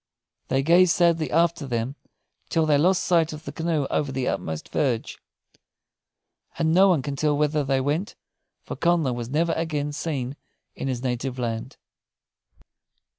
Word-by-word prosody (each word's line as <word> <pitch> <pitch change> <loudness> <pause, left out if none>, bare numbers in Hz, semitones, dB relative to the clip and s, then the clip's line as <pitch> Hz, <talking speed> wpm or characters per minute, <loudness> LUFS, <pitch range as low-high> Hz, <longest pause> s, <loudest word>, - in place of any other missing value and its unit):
They 135 +1 +1
gazed 170 +2 +5
sadly 170 -2 +2
after 165 -3 +1
them, 120 +2 -2 0.5
till 165 -1 +2
they 150 -2 +3
lost 180 +4 +3
sight 165 -3 +2
of 155 +1 -10
the 140 - -5
canoe 160 -1 -1
over 145 -3 0
the 130 -1 -2
utmost 80 -1 -3
verge; 125 -6 -1 1.4
and 160 -1 +1
no 190 +3 +6
one 170 -8 +2
can 140 -1 -3
tell 150 0 +1
whither 150 0 +1
they 135 -1 +1
went, 155 - -2 0.5
for - - -6
Connla 170 -6 +1
was 120 -1 -5
never 165 +4 +1
again 150 -3 -2
seen 140 -4 -3 0.4
in - - -5
his 125 -2 -3
native 125 0 -2
land. 115 -2 -4
150 Hz, 155 wpm, -24 LUFS, 130-165 Hz, 1.4 s, no